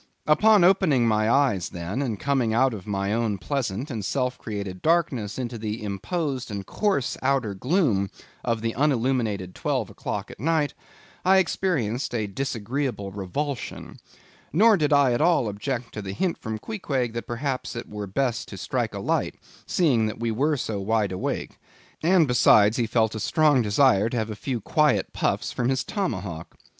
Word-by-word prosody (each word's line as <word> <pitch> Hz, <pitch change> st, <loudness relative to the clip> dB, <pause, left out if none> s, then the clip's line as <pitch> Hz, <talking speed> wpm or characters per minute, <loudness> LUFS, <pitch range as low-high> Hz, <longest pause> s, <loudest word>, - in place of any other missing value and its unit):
Upon 210 Hz, +5 st, +5 dB
opening 175 Hz, -10 st, +4 dB
my 110 Hz, 0 st, +2 dB
eyes 120 Hz, -8 st, +2 dB
then, 90 Hz, +9 st, -4 dB
and 115 Hz, -7 st, -2 dB
coming 130 Hz, -6 st, +1 dB
out 130 Hz, +1 st, +3 dB
of 100 Hz, -3 st, -8 dB
my 100 Hz, 0 st, -1 dB
own 110 Hz, -3 st, 0 dB
pleasant 125 Hz, -, -3 dB
and 110 Hz, -4 st, -4 dB
self 125 Hz, +4 st, -1 dB
created 100 Hz, -4 st, -5 dB
darkness 150 Hz, -11 st, +1 dB
into 120 Hz, -2 st, -4 dB
the 110 Hz, +1 st, -4 dB
imposed 130 Hz, -, -3 dB
and 100 Hz, -2 st, -5 dB
coarse 195 Hz, -, 0 dB
outer 130 Hz, -6 st, +1 dB
gloom 115 Hz, -, +1 dB, 0.3 s
of 115 Hz, -2 st, -1 dB
the 115 Hz, 0 st, -1 dB
unilluminated 120 Hz, -9 st, 0 dB
twelve -, -, -2 dB
o'clock -, -, -5 dB
at -, -, -13 dB
night, 155 Hz, -1 st, +1 dB, 0.5 s
I 190 Hz, +1 st, +5 dB
experienced 140 Hz, -, 0 dB
a 110 Hz, -2 st, 0 dB
disagreeable 120 Hz, -1 st, -3 dB
revulsion. 115 Hz, +9 st, -5 dB, 0.5 s
Nor 215 Hz, +6 st, +6 dB
did 155 Hz, -5 st, +1 dB
I 140 Hz, -4 st, +5 dB
at 120 Hz, -, 0 dB
all 165 Hz, -7 st, +3 dB
object 115 Hz, +4 st, -4 dB
to 105 Hz, -, -5 dB
the 95 Hz, -1 st, -5 dB
hint 175 Hz, -, -1 dB
from 110 Hz, -1 st, -4 dB
Queequeg 135 Hz, -, -3 dB
that 115 Hz, -, -5 dB
perhaps 130 Hz, +1 st, -3 dB
it 120 Hz, -, -5 dB
were 105 Hz, -1 st, -6 dB
best 120 Hz, +3 st, -1 dB
to -, -, -9 dB
strike -, -, -2 dB
a -, -, -4 dB
light, -, -, -1 dB, 0.3 s
seeing 130 Hz, -11 st, +2 dB
that 110 Hz, -, -5 dB
we 115 Hz, -1 st, -1 dB
were 145 Hz, +7 st, +1 dB
so 110 Hz, -5 st, -3 dB
wide 105 Hz, 0 st, +1 dB
awake; 95 Hz, -, -4 dB, 0.4 s
and 170 Hz, -1 st, +4 dB
besides 110 Hz, -3 st, +5 dB
he 120 Hz, -2 st, +1 dB
felt 110 Hz, -1 st, +1 dB
a 110 Hz, -, -4 dB
strong 150 Hz, +3 st, +3 dB
desire 110 Hz, -1 st, +3 dB
to 120 Hz, -, -3 dB
have 110 Hz, -1 st, -2 dB
a -, -, -5 dB
few 120 Hz, +1 st, -3 dB
quiet 150 Hz, +7 st, +2 dB
puffs -, -, -1 dB
from 125 Hz, 0 st, -1 dB
his 130 Hz, -2 st, +1 dB
Tomahawk. 95 Hz, -, -4 dB
120 Hz, 175 wpm, -25 LUFS, 105-145 Hz, 0.5 s, Nor